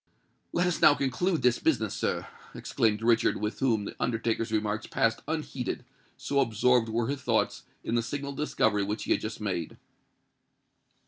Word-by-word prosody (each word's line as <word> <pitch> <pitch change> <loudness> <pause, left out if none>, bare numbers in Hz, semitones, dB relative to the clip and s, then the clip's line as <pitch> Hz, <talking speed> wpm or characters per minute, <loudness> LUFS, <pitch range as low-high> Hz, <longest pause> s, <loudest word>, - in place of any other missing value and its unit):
"Let 175 - +1
us 180 -2 -1
now 145 - +7
conclude 150 +4 0
this 125 -1 +3
business, 115 -10 +1
sir," - - -2 0.3
exclaimed 110 -1 0
Richard, 115 -1 +3
with 105 +1 -3
whom 115 -6 +1
the - - -7
undertaker's 115 -1 -1
remarks 110 0 -1
passed 115 0 +1
unheeded, 145 -6 -3 0.3
so 135 +1 0
absorbed 120 -1 +3
were 115 +1 0
his 140 +3 -3
thoughts - - 0 0.2
in - - -3
the 120 - +3
signal 140 +4 -4
discovery 110 -8 +1
which 105 +1 -3
he - - -3
had - - +3
just 110 +1 -5
made. 90 -6 -3
115 Hz, 165 wpm, -28 LUFS, 110-135 Hz, 0.3 s, now